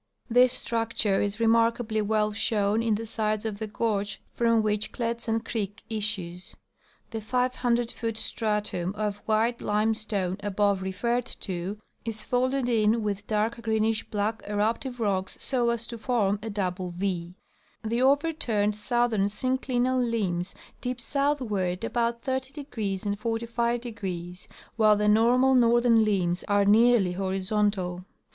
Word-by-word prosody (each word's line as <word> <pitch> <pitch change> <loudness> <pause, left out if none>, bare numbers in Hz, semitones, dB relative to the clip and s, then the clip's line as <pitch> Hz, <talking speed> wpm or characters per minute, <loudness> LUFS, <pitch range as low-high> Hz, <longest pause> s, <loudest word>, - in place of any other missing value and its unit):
This 250 +1 +6
structure 225 -5 0
is 205 +2 -2
remarkably 230 -1 +2
well 215 0 +1
shown 205 0 +1
in 225 -2 +1
the 225 +2 -4
sides 215 -1 -1
of 210 -2 -3
the 220 - -3
gorge 210 -1 -1
from 230 -2 +2
which 210 0 0
Kletsan 230 -1 -2
creek 215 -1 -4
issues. 195 -5 -3 0.6
The 225 -1 -4
500 245 0 0
foot 225 -2 -4
stratum 210 -5 -1
of 210 -1 -2
white 225 +2 +1
limestone 210 -3 0
above 205 -1 +1
referred 235 +6 -1
to 185 +1 -4 0.3
is 225 -2 -5
folded 255 +1 0
in 225 -1 +2
with 205 -1 -3
dark 220 +2 0
greenish 220 -1 +1
black 215 +1 -1
eruptive 225 +5 -1
rocks 190 -4 -1
so 245 -3 0
as 235 -1 -1
to 235 -1 -7
form 210 -5 +1
a 225 - -5
double 185 -3 -2
V; 175 -1 -3 0.5
the 230 +2 0
overturned 265 -7 +2
southern 230 -1 +1
synclinal 255 +3 0
limbs 195 -7 -1 0.3
dip 250 0 -3
southward 230 -10 -1
about 235 0 -1
30° 260 -7 -3
and 205 0 -2
45°, 225 -6 -3 0.3
while 215 -2 +5
the 210 0 +1
normal 240 +5 +4
northern 235 -2 +5
limbs 185 -4 0
are 205 -1 +3
nearly 220 -2 +5
hori 190 +1 -2
zontal. 190 -3 0
220 Hz, 135 wpm, -27 LUFS, 205-235 Hz, 0.6 s, This